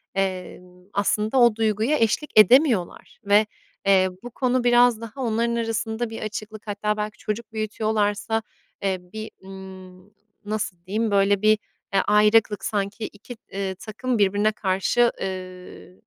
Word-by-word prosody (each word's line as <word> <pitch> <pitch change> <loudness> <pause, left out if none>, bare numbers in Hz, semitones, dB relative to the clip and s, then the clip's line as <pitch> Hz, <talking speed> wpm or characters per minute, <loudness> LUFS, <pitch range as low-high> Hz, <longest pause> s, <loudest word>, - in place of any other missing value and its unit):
emm, 180 -1 -4
aslında 210 +4 0
o 240 -3 +5
duyguya 225 +6 +1
eşlik 225 +7 0
edemiyorlar. 235 - +3
Ve, 205 +2 +5 0.4
eee, 190 -1 +4
bu 245 - -6
konu 255 0 0
biraz 240 -1 +4
daha 230 +4 -8
onların 235 0 0
arasında 225 0 -2
bir 225 - -7
açıklık 215 0 -7
hatta 210 +1 -1
belki 210 0 -4
çocuk 220 +2 -5
büyütüyorlarsa, 215 0 -1 0.4
eee, 190 -1 0 0.2
bir, 220 0 -6
ımm, 190 0 -12 0.3
nasıl 205 -3 -3
diyeyim? 215 +3 -1
Böyle, 200 0 +3
bir, 215 0 +5 0.4
eee, 195 - +4
ayrıklık 210 -1 +3
sanki 205 +1 -2
2, 220 +3 -12
eee, 195 -1 -3
takım 235 +4 -3
birbirine 205 +1 +2
karşı 210 +4 +1
eee, 185 -1 -7
215 Hz, 135 wpm, -24 LUFS, 195-225 Hz, 0.4 s, o